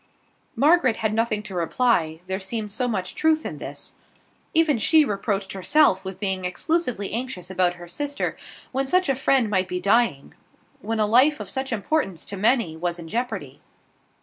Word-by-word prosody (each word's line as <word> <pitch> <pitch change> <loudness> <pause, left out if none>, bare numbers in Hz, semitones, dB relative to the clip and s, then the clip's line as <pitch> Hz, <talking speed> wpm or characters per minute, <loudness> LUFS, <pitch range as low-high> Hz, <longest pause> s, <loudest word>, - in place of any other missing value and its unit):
Margaret 290 -5 +4
had 220 -1 -1
nothing 220 -1 0
to 210 -3 -7
reply, 170 -2 +1
there 190 +1 -3
seemed 210 +1 -3
so 245 +4 -1
much 190 -6 -3
truth 315 0 +1
in - - -5
this. - - -7 0.6
Even 320 -6 +3
she 310 +7 +5
reproached 200 -2 -2
herself 195 +1 +3
with 190 -1 -7
being 190 -2 -1
exclusively 225 - -1
anxious 225 -7 -4
about 180 -1 +1
her 175 0 -11
sister, 285 +10 -3 0.4
when 270 +1 -1
such 365 +3 +2
a 270 - +2
friend 265 -2 +2
might 190 -3 0
be 180 0 -3
dying; 200 - +1 0.5
when 225 +3 -2
a 215 - +3
life 260 +8 +4
of - - -6
such 265 -1 -3
importance 210 - -1
to 200 - -5
many 215 -4 +1
was 175 +1 -2
in 170 -1 -9
jeopardy. 210 - -4
215 Hz, 175 wpm, -24 LUFS, 185-265 Hz, 0.6 s, she